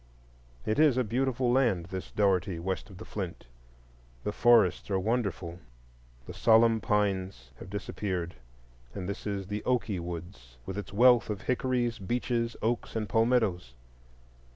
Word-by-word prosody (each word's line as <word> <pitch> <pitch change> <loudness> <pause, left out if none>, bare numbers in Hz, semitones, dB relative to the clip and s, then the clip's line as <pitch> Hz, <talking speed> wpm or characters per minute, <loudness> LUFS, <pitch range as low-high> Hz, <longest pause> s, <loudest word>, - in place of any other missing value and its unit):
It 110 - 0
is 150 -5 +5
a 130 - +3
beautiful 125 +2 0
land, 120 -10 +2
this 95 -1 -5
Dougherty, 95 -3 +1
west 95 +5 -3
of 95 - -12
the - - -9
Flint. 95 -5 -6 0.8
The - - -1
forests 110 -5 +4
are 95 - +1
wonderful, 95 -5 -2 0.7
the - - -8
solemn 115 0 +4
pines 100 -1 -1
have - - -9
disappeared, 95 -3 -3 0.6
and 90 -2 -4
this 100 +1 -5
is 100 -2 -3
the 105 +2 -4
"Oakey 115 -6 0
Woods," 85 -8 -8
with 95 - -5
its 100 -4 -6
wealth 120 +3 +5
of 105 -2 -3
hickories, 125 -2 0
beeches, 115 +3 -1
oaks 115 +1 -1
and 110 -2 -1
palmettos. 110 - +1
105 Hz, 145 wpm, -29 LUFS, 95-120 Hz, 0.8 s, is